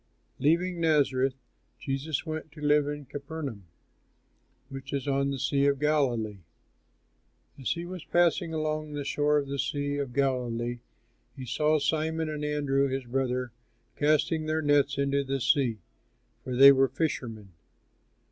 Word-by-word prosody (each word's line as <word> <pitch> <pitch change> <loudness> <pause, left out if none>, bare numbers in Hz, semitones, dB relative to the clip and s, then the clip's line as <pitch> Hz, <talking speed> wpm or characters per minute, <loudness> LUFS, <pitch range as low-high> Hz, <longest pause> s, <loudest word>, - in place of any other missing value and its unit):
Leaving 170 +4 +1
Nazareth, 135 -5 +2 0.4
Jesus 135 +2 -3
went 155 -1 -5
to 155 - -13
live 150 0 +3
in 145 -1 -5
Capernaum, 140 - -6 1.0
which 135 0 -8
is 140 0 -2
on 140 0 +1
the 140 - -2
Sea 140 +2 +1
of 140 0 +2
Galilee. 125 -9 0 1.2
As 130 - 0
he 170 0 -6
was 180 -2 -7
passing 175 0 +2
along 155 -1 -2
the 145 -1 -3
shore 150 +1 +1
of 140 -1 -1
the 140 0 -4
Sea 145 +1 -1
of 140 -3 -3
Galilee, 120 -3 -1 0.6
he 130 - -6
saw 155 +5 +2
Simon 160 +2 -1
and 150 -1 -4
Andrew 145 -2 +1
his 135 -1 -3
brother 125 0 -1 0.4
casting 155 +1 +1
their 155 0 0
nets 145 -1 +3
into 140 0 +1
the 135 0 -2
sea, 130 -4 +2 0.7
for 125 - -4
they 135 +2 +10
were 135 0 +4
fishermen. 120 - -3
140 Hz, 145 wpm, -28 LUFS, 135-155 Hz, 1.2 s, they